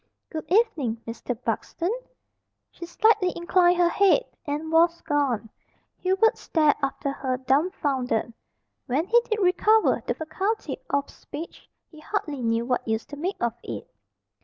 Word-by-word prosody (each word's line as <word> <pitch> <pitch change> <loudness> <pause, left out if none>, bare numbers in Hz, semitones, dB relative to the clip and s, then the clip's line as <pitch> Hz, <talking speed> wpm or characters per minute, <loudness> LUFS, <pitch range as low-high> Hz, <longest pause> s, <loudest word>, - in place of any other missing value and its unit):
"Good 315 0 -6
evening, 330 - +2
Mister 230 +2 -4
Buxton." 335 - -2 0.8
She 340 - -9
slightly 395 0 +3
inclined 350 +1 +3
her 350 -1 +4
head 400 +7 +4 0.2
and 300 +2 -3
was 335 +1 +4
gone. 265 -7 0 0.5
Hubert 385 +4 +2
stared 305 -3 +2
after 275 +1 -2
her 260 -2 -2
dumfounded. 265 - 0 0.5
When 275 +6 +1
he 475 +5 +4
did 435 - +1
recover 420 +4 +3
the - - 0
faculty 390 +7 -2
of 280 0 0
speech 315 +4 -9 0.2
he 310 - -14
hardly 305 -5 -3
knew 230 0 0
what 250 -1 -1
use 220 0 -1
to 290 - -9
make 355 +7 -3
of 235 -1 0
it. - - -7
315 Hz, 140 wpm, -25 LUFS, 265-370 Hz, 0.8 s, her